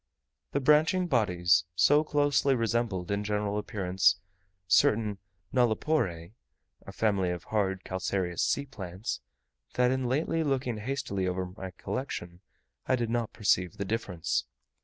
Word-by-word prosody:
The 140 - +2
branching 155 +6 +4
bodies 90 - +3
so 145 - +5
closely 145 -2 +2
resembled 115 -6 -1
in 100 +1 0
general 105 0 -1
appearance 95 -4 +2 0.5
certain 105 0 +3 0.3
nulliporae 110 - +1 0.6
(a - - -6
family 100 -4 +1
of 90 -1 -4
hard 95 -3 -1
calcareous 95 -1 -2
sea 140 - +1
plants), 95 - -5 0.5
that 125 0 +3
in 130 -1 0
lately 160 +4 0
looking 130 -5 -1
hastily 105 -5 -2
over 90 0 -1
my 95 -3 -6
collection 90 -3 -5 0.5
I 130 - +3
did 120 -2 -2
not 120 -2 -1
perceive 95 -2 +1
the 100 - -3
difference. 95 -5 -2
105 Hz, 130 wpm, -29 LUFS, 95-130 Hz, 0.6 s, so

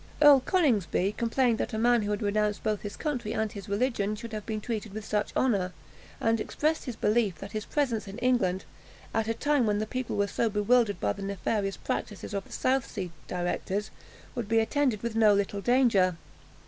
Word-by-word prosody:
Earl 290 -2 +8
Coningsby 230 - +1
complained 235 0 +1
that - - -2
a - - -1
man 240 +1 +4
who 205 - -2
had 210 +2 -1
renounced 210 0 0
both 215 -2 0
his 205 -1 -6
country 255 -8 -2
and 220 -1 0
his 200 -1 -9
religion, 210 -1 0
should 230 +1 -8
have 215 -1 -5
been 215 -1 -2
treated 215 -2 -4
with 215 -1 -5
such 210 0 -1
honour, 195 -8 +1 0.5
and 225 0 +2
expressed 310 +6 -1
his 250 -4 -4
belief 210 -4 +1
that 195 +5 -9
his 215 -1 -4
presence 245 -8 -1
in 195 - -7
England, 195 -7 +1 0.5
at 220 -1 0
a 225 - 0
time 290 -2 +2
when 205 -1 +2
the 215 - -1
people 255 +2 -3
were 200 - +3
so 225 +3 0
bewildered 210 -1 +2
by 100 -1 +1
the - - -9
nefarious 195 +1 -2
practices 205 0 -4
of 200 -1 -2
the - - -18
South 260 -1 0
Sea 185 -4 -5 0.2
directors, 185 +3 -2 0.4
would 235 -5 -4
be 225 - +3
attended 235 -1 +1
with 235 -1 -2
no 215 -2 +5
little 200 0 -1
danger. 215 -8 +3
215 Hz, 200 wpm, -28 LUFS, 200-240 Hz, 0.5 s, Earl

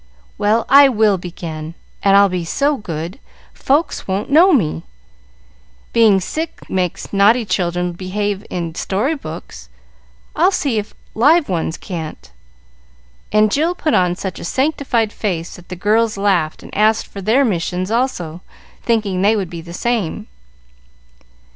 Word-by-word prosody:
Well, 220 +2 +2
I 280 +1 +7
will 215 -5 +2
begin; 165 -2 -7 0.3
and 195 0 +5
I'll 200 0 +6
be 180 -2 -3
so 285 - +1
good, 170 - -6 0.3
folks 290 +5 0
won't 195 +6 -2
know 340 +6 +6
me. 160 - +1 1.1
Being 220 -4 +5
sick 315 - -5
makes 185 0 -3
naughty 215 +4 +4
children 180 -2 -1
behave 195 +3 -3
in 170 -2 -4
story 210 - -1
books, 155 - -9 0.7
I'll 355 +3 +4
see 280 - 0
if 210 - -8 0.2
live 295 +7 +4
ones 165 -2 -2
can't;" 160 - -7 1.0
and 215 0 +3
Jill 325 +8 +1
put 310 -3 -1
on 180 -1 +2
such 190 0 -5
a - - -8
sanctified 260 - 0
face 175 -6 -3
that 180 - -16
the 180 - -5
girls 215 +4 +1
laughed 185 -6 0
and - - -11
asked 215 +1 +3
for 200 - -9
their 230 +8 +3
missions 185 -1 -2
also, 180 -9 -2 0.4
thinking 210 -5 0
they 210 +3 +4
would 195 -5 -3
be 170 -1 -6
the 170 +1 -11
same. 215 -1 -2
200 Hz, 145 wpm, -18 LUFS, 175-235 Hz, 1.1 s, I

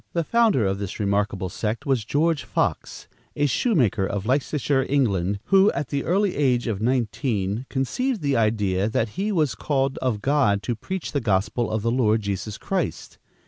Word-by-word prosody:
The 170 - 0
founder 220 - +3
of 95 0 -1
this 100 +1 -5
remarkable 100 -2 0
sect 110 +4 -3
was 130 -5 +1
George 145 +4 +1
Fox, 120 - -2 0.3
a 145 - +1
shoemaker 140 - +1
of 100 +1 -2
Leicestershire, 135 +1 +1
England, 100 -9 +1
who, 195 - +4
at 145 - -3
the 140 -1 -2
early 195 +2 +1
age 125 -4 +1
of 110 -4 -2
nineteen, 115 -2 -1
conceived 215 - -1
the 140 -1 +1
idea 105 -3 +1
that 115 0 0
he 200 - -2
was 155 - +1
called 135 +4 -1
of 125 -5 -1
God 110 -8 +2
to 120 - -2
preach 190 - -5
the 140 - -1
gospel 105 +2 0
of 110 -1 -2
the 115 - +1
Lord 110 -3 +2
Jesus 100 +1 -4
Christ. - - -3
120 Hz, 175 wpm, -24 LUFS, 105-145 Hz, 0.3 s, who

